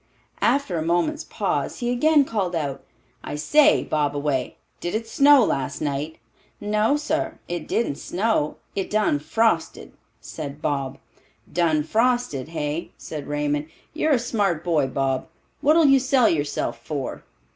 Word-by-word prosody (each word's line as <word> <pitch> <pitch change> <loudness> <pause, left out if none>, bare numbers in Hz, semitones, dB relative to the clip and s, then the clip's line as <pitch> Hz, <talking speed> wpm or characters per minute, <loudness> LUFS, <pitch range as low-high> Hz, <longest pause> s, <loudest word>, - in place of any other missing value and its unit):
After 240 - +1
a - - -2
moment's 175 - 0
pause, - - -2
he 240 -1 -1
again 295 +3 +4
called 195 -8 -2
out, 140 -4 -3 0.4
"I - - -5
say, 295 - +4
Bobaway, 145 -3 -1 0.2
did 175 +4 -3
it 225 +1 -2
snow 280 +1 +6
last 135 -7 -2
night?" 145 +2 -3 0.4
"No, 210 +6 +1
sar, 315 +2 -2
it 175 0 -4
didn't 185 -12 0
snow; 185 -5 0 0.2
it 195 - -2
done 210 -8 +2
frosted," 170 +3 0 0.3
said 145 -2 -7
Bob. 140 -3 -2 0.6
"Done 160 -3 +2
frosted, 230 - 0
hey?" 155 0 -4
said 150 -3 -7
Raymond. 145 0 -1 0.3
"You're 310 -1 +1
a - - +5
smart 205 -8 0
boy, 155 -6 +2
Bob. 135 0 -1 0.3
What'll 315 +3 +5
you 275 -1 +6
sell 255 -2 +3
yourself 145 -3 -1
for?" 145 -4 -4
175 Hz, 140 wpm, -23 LUFS, 145-245 Hz, 0.6 s, snow